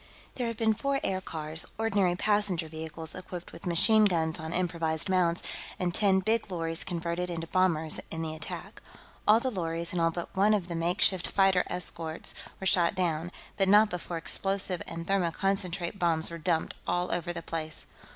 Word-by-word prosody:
There 245 -2 -2
had 230 -1 -4
been 220 -1 +3
four 275 +5 -1
aircars, 160 -4 -1
ordinary 200 -5 +2
passenger 205 -4 +1
vehicles 160 0 -5
equipped 180 -1 -8
with 170 - -8
machine 215 +6 +5
guns 165 -4 +1
on 160 0 -5
improvised 165 -2 0
mounts, 180 -2 +2 0.3
and 180 -1 -1
ten 195 -2 +3
big 220 +2 0
lorries 165 -2 -1
converted 175 0 -2
into 165 -1 -3
bombers, 165 -3 +1
in 165 0 -4
the 160 -1 -3
attack. 155 - -5 0.5
All 215 +2 +7
the 260 +2 -2
lorries, 170 -4 -3
and 180 - -1
all 165 - +4
but 170 +1 -6
one 205 +3 +4
of 180 -4 -3
the 170 - -3
makeshift 175 +2 +2
fighter 195 -2 +3
escort, 165 -2 -3 0.3
were 190 - -5
shot 175 -1 +4
down, 175 -2 -1 0.3
but 195 -1 +3
not 210 +2 +6
before 175 -1 -4
explosive 190 +2 0
and 165 0 -6
thermoconcentrate 190 0 0
bombs 165 -1 +1
were 170 - -6
dumped 165 -1 0
all 175 +1 0
over 175 0 -1
the 170 -1 -6
place. 160 -1 -3
175 Hz, 175 wpm, -29 LUFS, 165-195 Hz, 0.5 s, All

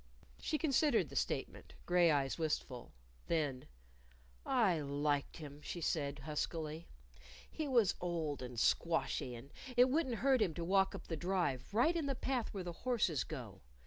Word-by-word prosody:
She 310 - -1
considered 295 -1 +2
the - - -10
statement, - - -2
gray 175 -1 +5
eyes 140 -1 +1
wistful. 145 -6 -2 0.4
Then, 145 -6 -1 0.8
"I 220 -11 +3
liked 145 0 -1
him," 150 -2 -9
she 175 - -5
said 145 -3 -1
huskily. 155 +2 -3 0.6
"He 310 - -3
was 235 -8 +4
old 165 -5 -2
and 125 -2 -5
squashy, 150 -4 +1
and 125 +4 -11 0.3
it 250 +1 +6
wouldn't 275 -5 +1
hurt 265 -3 +5
him 175 -7 +1
to 170 - -3
walk 190 +2 +3
up - - -8
the 165 - -3
Drive, 160 -7 -1
right 245 +11 +3
in 320 -4 0
the 275 - 0
path 250 -2 -1
where 195 -3 -4
the 175 -1 -5
horses 210 - +1
go. 120 - -8
165 Hz, 160 wpm, -36 LUFS, 145-230 Hz, 0.8 s, it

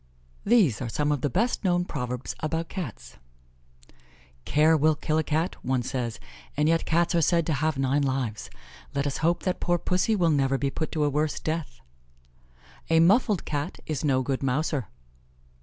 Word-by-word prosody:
_ - - -35 0.5
These 195 - +4
are 120 - -3
some 150 +5 0
of 145 -3 -1
the 145 - 0
best 230 - 0
known 175 -2 +2
Proverbs 125 -5 -4
about 160 +1 -2
Cats: 165 - -7 1.3
"Care 155 +2 +4
will 155 +1 +3
kill 155 +1 0
a - - +1
Cat," 160 +4 -1
one 130 -1 0
says, 120 -2 -3 0.4
and 150 +1 +2
yet 165 +1 +2
Cats 170 +2 +1
are 170 - +3
said 170 +1 +2
to 160 - 0
have 155 +1 0
nine 135 +2 +1
lives. 130 -6 -2 0.5
Let 140 0 0
us 140 - -1
hope 170 +2 +1
that 185 -1 -1
poor 175 0 +1
Pussy 185 +6 +1
will 170 -5 +2
never 135 -2 +2
be 140 0 -1
put 160 - -3
to 155 - +1
a 145 - +2
worse 150 +1 0
death. 155 - -4 1.1
"A 165 0 +5
muffled 200 +2 +3
Cat 145 +3 -3
is 155 -3 -3
no 130 -3 +2
good 135 0 -2
mouser." 135 - -1
150 Hz, 185 wpm, -26 LUFS, 135-165 Hz, 1.3 s, A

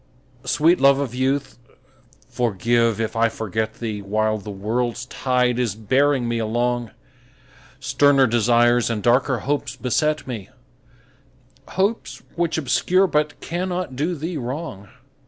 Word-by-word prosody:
Sweet 155 +7 +3
love 140 0 +6
of 140 -4 -3
youth, 135 +1 -1 0.7
forgive 115 0 +1
if 115 0 -2
I 115 0 +3
forget 110 0 -3
thee 110 -3 -4
While 110 +2 0
the 105 - -9
world's 115 +5 -2
tide 125 -1 0
is 120 -4 -1
bearing 130 +4 +1
me 115 0 -1
along; 120 +1 -1 0.9
Sterner 145 -2 +4
desires 120 +1 +3
and 110 -3 -2
darker 125 +1 +2
hopes 145 -2 -2
beset 150 +4 0
me, 110 -7 -6 1.3
Hopes 200 +4 -1
which 170 -1 -1
obscure 180 +6 +2
but 150 -4 -1
cannot 180 -4 -3
do 160 +7 -1
thee 165 +2 -4
wrong. 125 - -6
125 Hz, 125 wpm, -22 LUFS, 115-145 Hz, 1.3 s, love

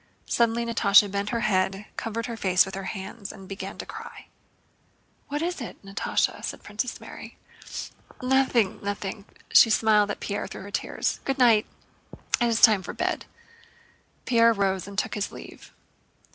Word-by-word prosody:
Suddenly 235 0 +1
Natásha 205 -3 +5
bent 200 +1 -2
her 235 0 -1
head, 195 -2 +1
covered 225 +1 -3
her 235 - -4
face 185 -4 +3
with 190 - -8
her 195 0 -5
hands, 200 +2 -6
and 195 -2 -12
began 195 0 -6
to - - -6
cry. - - -9 1.0
"What 295 +2 -2
is 350 -4 -2
it, 235 - -7
Natásha?" 195 +1 -1
said - - -5
Princess 210 +4 -4
Mary. - - -10 0.8
"Nothing, 255 -5 +2
nothing." 200 0 -4 0.3
She 225 - +8
smiled 215 -1 +4
at 205 - -3
Pierre 205 - -3
through - - -8
her 200 - -9
tears. - - -2
"Good 270 0 -1
night! 230 -4 +5 0.7
It 240 - +4
is 230 -1 +1
time 215 -4 +7
for 185 - -7
bed." - - -2 1.0
Pierre 230 -2 +5
rose 195 -3 0
and 200 -1 -9
took - - 0
his 205 -1 -2
leave. - - -12
210 Hz, 160 wpm, -26 LUFS, 195-235 Hz, 1.0 s, She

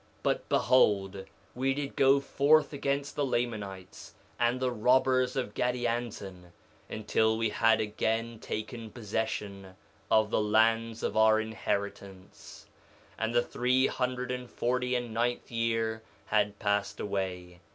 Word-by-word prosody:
But - - -1
behold, 100 -6 +2 0.3
we 135 +2 0
did 140 -1 -4
go 135 +1 +5
forth 145 +2 +3
against 140 0 -2
the 145 - 0
Lamanites 105 -8 -4 0.2
and 120 +1 +2
the 130 -1 0
robbers 125 +2 +2
of 125 -6 -2
Gadianton, 115 -7 -3 0.4
until 110 +1 +1
we 115 -1 0
had 115 +1 +3
again 110 +2 -2
taken 110 +2 -5
possession 105 -4 -4 0.3
of 110 0 +3
the - - +2
lands 115 +1 +2
of - - -1
our 110 0 +5
inheritance. 100 -3 -5 0.5
2:28 - - -2
And 115 +1 -1
the 120 - +4
three 130 +2 +1
hundred 125 -1 -2
and 125 -1 -5
forty 125 +1 -1
and 120 -2 -3
ninth 120 +2 -1
year 115 -1 -1 0.2
had 105 -1 +1
passed 100 -1 -1
away. 90 -3 -4
115 Hz, 130 wpm, -29 LUFS, 105-125 Hz, 0.5 s, go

